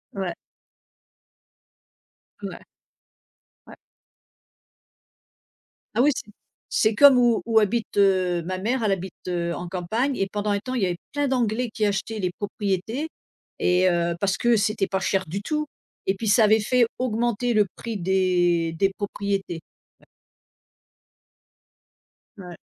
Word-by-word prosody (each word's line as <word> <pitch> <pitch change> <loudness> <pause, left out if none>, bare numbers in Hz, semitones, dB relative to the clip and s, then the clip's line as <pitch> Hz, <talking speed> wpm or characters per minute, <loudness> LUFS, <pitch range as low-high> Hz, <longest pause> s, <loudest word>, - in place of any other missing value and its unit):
Ouais. 190 -3 -2 2.1
Ouais. - - -7 1.0
Ouais. - - -12 2.2
Ah 240 - +3
oui! 290 - +5
C'est 210 - -7 0.4
c'est 220 -1 +3
comme 275 -1 +8
où 240 -2 +3
où 225 -1 +4
habite, 220 +1 -1
heu, 185 -3 +3
ma 185 0 -2
mère, 235 +6 -1
elle 210 - +2
habite, 190 -1 -5
heu, 170 -1 -1
en 175 - -5
campagne 220 +10 -1
et 195 - 0
pendant 205 +1 -3
un 205 0 +1
temps, 255 +4 -6
il 245 - -1
y - - +3
avait 175 -1 -2
plein 290 0 0
d'anglais 245 -2 0
qui 215 -1 0
achetaient 205 +2 -2
les 180 -3 -1
propriétés 205 - -3 0.5
et 180 +1 +3
heu, 170 0 0
parce 195 -1 0
que 240 -1 +3
c'était 205 -1 0
pas 190 - -1
cher 190 -1 0
du 195 +6 -4
tout 300 +2 -2 0.4
et 190 - +2
puis 220 - -4
ça 215 +1 +5
avait 220 +1 +5
fait 235 +2 +2
augmenter 240 -1 0
le 210 -2 +3
prix 230 -3 -5
des 175 -3 +1
des 195 +4 +2
propriétés. 195 -3 -3 0.4
Ouais. - - -25 2.3
Ouais. 180 -3 -9
205 Hz, 145 wpm, -24 LUFS, 185-230 Hz, 2.3 s, comme